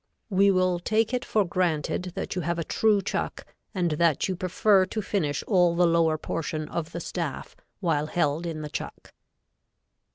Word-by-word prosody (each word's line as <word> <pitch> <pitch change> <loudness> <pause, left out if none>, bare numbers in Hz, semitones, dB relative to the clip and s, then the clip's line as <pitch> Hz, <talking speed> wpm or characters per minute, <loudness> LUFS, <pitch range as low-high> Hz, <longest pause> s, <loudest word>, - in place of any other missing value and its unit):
We 200 +1 +4
will 185 -2 +2
take 220 +6 +1
it 250 - 0
for 210 -2 +1
granted 175 0 -1
that - - -3
you 180 - -2
have 170 +1 -1
a 165 - -1
true 210 +3 +2
chuck - - -3 0.3
and 175 -4 0
that 155 -1 +2
you 190 - -2
prefer 185 +2 +3
to 220 - -4
finish 170 -9 -1
all 180 -4 +3
the 175 +1 +4
lower 165 -2 +3
portion 155 -1 -3
of 165 -1 -4
the 170 - -5
staff 170 -4 -5 0.3
while 155 -5 +1
held 155 0 0
in 155 -2 -4
the 150 - -5
chuck. - - -7
175 Hz, 175 wpm, -26 LUFS, 160-190 Hz, 0.3 s, We